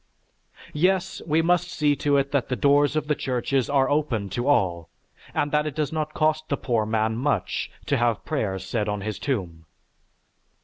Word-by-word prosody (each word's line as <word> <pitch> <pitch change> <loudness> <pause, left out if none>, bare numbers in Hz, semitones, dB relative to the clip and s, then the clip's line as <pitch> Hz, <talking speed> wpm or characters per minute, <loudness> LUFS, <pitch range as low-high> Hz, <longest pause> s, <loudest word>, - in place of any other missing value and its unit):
Yes, 185 +4 +1
we 160 +1 +2
must 180 +1 +2
see 150 -3 +2
to 145 -1 +2
it 140 0 0
that 140 -3 0
the 125 - 0
doors 145 +5 +3
of 155 -1 0
the 150 - +1
churches 130 -2 -1
are 135 -2 +3
open 130 -9 0
to 120 +7 -3
all, 90 - +1 0.4
and 145 - -1
that 150 0 +1
it 150 - -5
does 155 -1 -1
not 155 -1 -3
cost 155 0 +1
the 140 - 0
poor 115 -5 0
man 110 0 0
much 125 -5 -1 0.2
to - - +1
have 120 -2 0
prayers 100 - -2
said 105 +1 -1
on 105 -1 -2
his 105 0 -4
tomb." 90 - -3
140 Hz, 185 wpm, -25 LUFS, 110-150 Hz, 0.4 s, doors